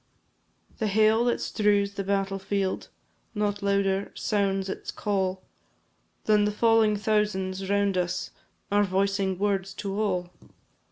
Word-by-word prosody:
The 220 - 0
hail 220 +3 +3
that 240 - +1
strews 205 -2 +1
the 200 - -3
battle 195 0 -1
field 195 -1 -2 0.5
Not 205 -1 -1
louder 200 -1 +1
sounds 195 -2 0
its 190 - -6
call, 190 -3 -1 0.8
Than 210 -1 +4
the 210 - +1
falling 220 -1 +3
thousands 195 -3 -1
round 200 -2 +2
us 175 0 -2 0.4
Are 205 0 +4
voicing 195 0 0
words 195 -1 -1
to 200 0 -3
all. 180 -4 -1
200 Hz, 125 wpm, -27 LUFS, 195-210 Hz, 0.8 s, Than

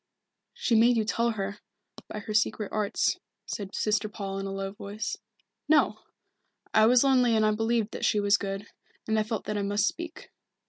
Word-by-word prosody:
"She 240 - -1
made 230 +2 +5
you 220 - +1
tell 235 +2 +1
her, 200 -2 -3 0.5
by 210 - -6
her 215 - -5
secret 215 -1 +1
arts," 210 -2 0 0.3
said 200 -2 -5
Sister 215 0 0
Paul 195 -2 -5
in 195 - -4
a - - -4
low 195 0 -3
voice. 205 +1 -5 0.5
"No 310 - +4 0.7
I 220 0 +6
was 250 +2 +6
lonely 250 -4 +4
and 215 -1 +3
I 215 - +4
believed 225 0 0
that - - -6
she 210 - +3
was 205 0 +4
good, 195 0 -3 0.4
and 220 0 +2
I - - +3
felt 215 0 -3
that 210 -1 -2
I - - 0
must 205 +1 +1
speak. 335 -1 -6
215 Hz, 190 wpm, -28 LUFS, 200-225 Hz, 0.7 s, I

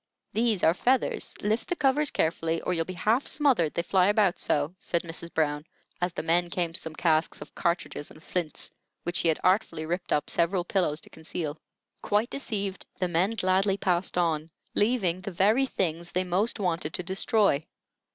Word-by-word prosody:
"These 220 -4 +1
are 160 - +6
feathers; 250 +7 0
lift 215 +3 0
the 355 - 0
covers 285 0 +2
carefully 165 0 0
or 180 - -1
you'll 165 -1 0
be 185 - -6
half 220 - +1
smothered, 255 - +2
they 170 - 0
fly 185 +1 +3
about 205 -3 +3
so," 145 +3 0
said 170 - -1
Mrs. 170 0 -6
Brown, 150 -2 0 0.4
as 180 0 +1
the 170 - -4
men 170 +2 +2
came 170 -1 -1
to - - 0
some 160 -1 -6
casks 160 -1 +1
of 150 - -10
cartridges 170 -4 -2
and 155 - -15
flints, 175 -4 -3 0.3
which 175 - -2
she - - +2
had 160 - +2
artfully 185 -4 +2
ripped 175 +3 -3
up 150 - +1
several 175 +2 +1
pillows 175 -5 0
to - - -7
conceal. 160 -1 -5 0.4
Quite 210 +3 +1
deceived, 200 -8 -3 0.2
the 185 - +1
men 175 +3 +2
gladly 190 0 +2
passed 180 -2 0
on, 160 -2 +1 0.2
leaving 205 -6 +1
the 195 - -5
very 210 +9 +3
things 170 -6 -1
they 185 - +1
most 190 +6 +1
wanted 170 -4 -1
to 180 - -3
destroy. 190 -4 +2
180 Hz, 185 wpm, -28 LUFS, 165-200 Hz, 0.4 s, are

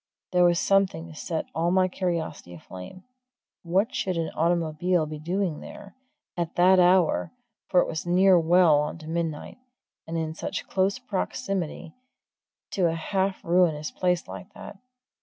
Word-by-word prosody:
There 180 -1 +4
was 175 -1 +3
something 195 -4 +1
to 165 - -11
set 160 0 -3
all 165 +1 0
my 185 +1 +3
curiosity 170 - -4
aflame! 90 - -11 0.6
what 185 +5 0
should 185 -2 -2
an 165 -1 -2
automobile 170 +1 +1
be 155 0 -7
doing 175 0 -2
there, 200 -1 -11 0.4
at 170 -2 -3
that 185 +1 +5
hour 180 -1 +3 0.4
for 180 - +5
it - - -1
was 160 - -4
now 175 - 0
nearing 185 -3 +5
well 170 -4 +5
on 150 +2 -3
to 155 -1 -12
midnight 165 +3 -4 0.5
and 165 +1 -3
in 160 -1 -2
such - - -5
close 195 +3 +1
proximity 195 -8 -4 0.8
to 185 -3 +2
a 165 - -1
half 190 +3 -2
ruinous 170 -3 +2
place 180 -1 0
like 200 - -9
that? 210 -1 -10
175 Hz, 160 wpm, -26 LUFS, 160-185 Hz, 0.8 s, that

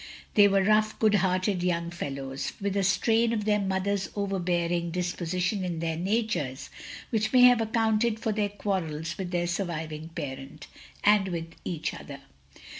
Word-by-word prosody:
They 205 -1 +7
were 195 -1 +3
rough, 215 +1 +3
good 215 -2 +3
hearted 185 -1 +1
young 170 -1 -1
fellow^ 140 -5 -4
with 200 -1 -2
a 200 - +2
strain 225 +4 +2
of 210 -2 -1
their 210 -1 +3
mother's 195 -1 -1
overbearing 175 -4 0
dis 180 +1 -1
position 180 +3 -1
in 175 -2 -3
their 165 0 -2
natures 175 - -2 0.4
which 220 -2 0
may 255 - +6
have 245 -2 +7
accounted 225 0 +1
for 220 - -1
their 205 -1 0
quarrels 170 -6 -3
with 185 -2 -3
their 175 -1 0
surviving 165 -3 -3
parent, 145 -2 -7 0.4
and 205 -2 +5
with 165 -2 -4
each 165 -3 -3
other. 140 -1 -9
185 Hz, 160 wpm, -27 LUFS, 170-210 Hz, 0.4 s, They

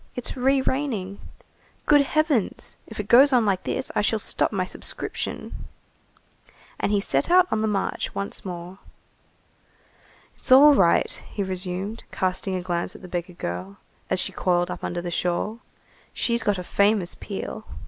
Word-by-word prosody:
It's 250 - -4
re 265 +1 +2
raining! 240 -9 -2 0.7
Good 290 -1 +6
Heavens, 290 - 0
if 220 - -10
it 210 - -3
goes 270 +6 +7
on 245 -4 +4
like 190 -3 0
this, 265 - -1
I - - +1
shall 220 +2 +1
stop 215 - 0
my 190 -3 -1
subscription." - - -3 1.3
And - - 0
he 205 - +3
set 200 - 0
out 365 +1 +6
on 215 - +1
the 220 - +1
march 200 -2 -2
once 200 0 -3
more. 180 0 -7 1.6
"It's - - -6
all 285 +3 +9
right," 180 -10 +3
he 205 - -3
resumed, 190 +3 -4
casting 185 +1 -1
a 180 - -3
glance 175 -1 -2
at - - -13
the - - -8
beggar 180 0 -4
girl, 95 - -6 0.3
as - - +1
she - - -1
coiled 175 -1 0
up - - -7
under 175 0 -3
the 175 - -4
shawl, 180 +6 -1 0.6
"she's 235 0 +1
got 205 -2 +1
a 180 - -5
famous 200 -1 +2
peel." 215 +2 -7
200 Hz, 165 wpm, -24 LUFS, 180-235 Hz, 1.6 s, all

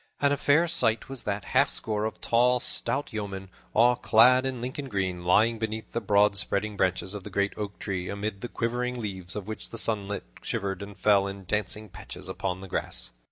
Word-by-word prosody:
And 145 0 +3
a - - 0
fair 155 +5 +4
sight 115 -9 +3
was 135 -2 -4
that 100 -1 -2
halfscore 110 -1 +2
of 110 - -8
tall, 125 +2 +3
stout 135 +2 0
yeomen, 95 -3 -5 0.2
all 120 +2 +6
clad 125 +4 +5
in 130 -2 -3
Lincoln 130 +3 -5
green, 95 -4 -2
lying 110 +6 +4
beneath 110 -1 -4
the 115 - -2
broad 105 0 +4
spreading 100 +1 -1
branches 95 0 0
of 105 -2 -6
the - - -7
great 100 0 0
oak 105 -2 -5
tree, 90 -2 -3
amid 100 0 -4
the 120 - -3
quivering 125 +1 -2
leaves 95 -5 -4
of 105 -3 -4
which 110 +1 -6
the 115 - -7
sunlight 105 -3 -1 0.2
shivered 95 -1 -3
and 100 0 -8
fell 100 -2 +4
in 100 -1 -7
dancing 105 +2 -1
patches 95 - -10
upon 90 +1 -3
the 95 - -8
grass. - - -1
105 Hz, 200 wpm, -27 LUFS, 100-115 Hz, 0.2 s, all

